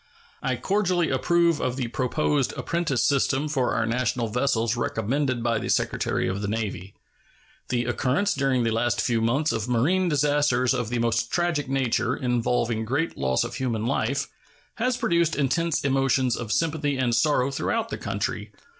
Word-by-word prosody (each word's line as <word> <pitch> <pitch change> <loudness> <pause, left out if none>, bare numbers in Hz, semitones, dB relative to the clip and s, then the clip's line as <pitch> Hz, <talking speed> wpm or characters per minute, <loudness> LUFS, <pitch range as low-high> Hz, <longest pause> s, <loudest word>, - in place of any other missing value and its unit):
I - - 0
cordially 185 -4 0
approve 170 -2 +2
of 125 - -1
the 130 -3 -2
proposed 135 +3 0
apprentice 165 -7 0
system 140 +1 +1
for 135 -4 0
our 115 - +1
national 120 0 -1
vessels 115 -1 0
recommended 120 +2 -1
by 115 -2 +1
the 120 - -5
Secretary - - 0
of 95 +2 -2
the 105 - -2
Navy. 100 -3 -4 0.7
The 120 -1 0
occurrence 130 +10 +1
during 135 -3 +1
the 115 - +1
last 120 +1 0
few 115 -1 +1
months 135 +7 +1
of 110 +2 -3
marine 175 +10 +2
disasters 145 -4 +2
of 125 -4 -2
the 125 - -1
most 115 0 0
tragic 170 -6 0
nature, 130 -2 0
involving 120 -2 0
great 140 +9 -1
loss 65 -1 +1
of - - -5
human 120 -3 -2
life, 140 +2 0 0.5
has 250 +2 0
produced 170 -5 +1
intense 165 +4 0
emotions 135 -2 +2
of 115 -3 -5
sympathy 150 -2 0
and 125 -2 +1
sorrow 130 +1 +2
throughout 140 - -1
the - - -4
country. - - -3
130 Hz, 165 wpm, -25 LUFS, 115-145 Hz, 0.7 s, approve